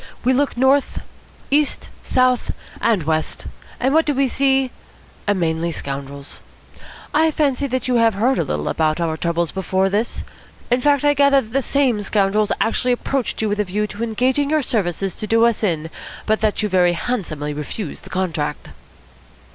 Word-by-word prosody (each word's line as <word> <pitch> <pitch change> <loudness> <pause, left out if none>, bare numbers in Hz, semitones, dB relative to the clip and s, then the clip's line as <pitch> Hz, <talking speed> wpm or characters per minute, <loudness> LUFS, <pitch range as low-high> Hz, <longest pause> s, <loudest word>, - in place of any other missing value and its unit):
We 255 - +3
look 280 -1 0
north, 265 +2 +2 0.5
east, 295 +1 +1
south, 255 -1 +1 0.3
and 220 -7 +2
west, 155 +1 -2 0.3
and 260 +3 +1
what 320 0 +3
do 295 - +1
we 275 0 +2
see? 270 0 +2 0.6
Mainly 170 -3 0
scoundrels. 140 -1 -6 0.7
I 320 +1 +4
fancy 285 -3 0
you 250 -1 +1
have 225 -2 +3
heard 245 +6 +2
a - - +2
little 75 0 -3
about 155 0 0
our 165 -2 0
troubles 170 0 -1
before 190 0 0
this. 215 +4 -1 0.5
In 245 +1 +3
fact, 285 0 +3
I 290 - +5
gather 280 -1 +5
that 220 -3 -8
the 275 - +2
same 260 -5 +1
scoundrels 205 +1 +1
actually 250 +2 +1
approached 250 -2 -2
you 215 - +1
with 205 +1 -1
a - - +3
view 205 +2 -1
to 210 +2 -6
engaging 255 +5 +1
your 305 -1 +2
services 195 -5 -1
to 215 - -5
do 225 +2 +4
us 235 -1 +1
in, 165 -5 -1 0.3
but 215 -1 +1
that 215 0 +1
you - - +2
very 180 -3 +3
handsomely 165 -9 -3
refused 150 +4 -6
the - - -12
contract." 170 -5 -3
215 Hz, 170 wpm, -20 LUFS, 175-260 Hz, 0.7 s, I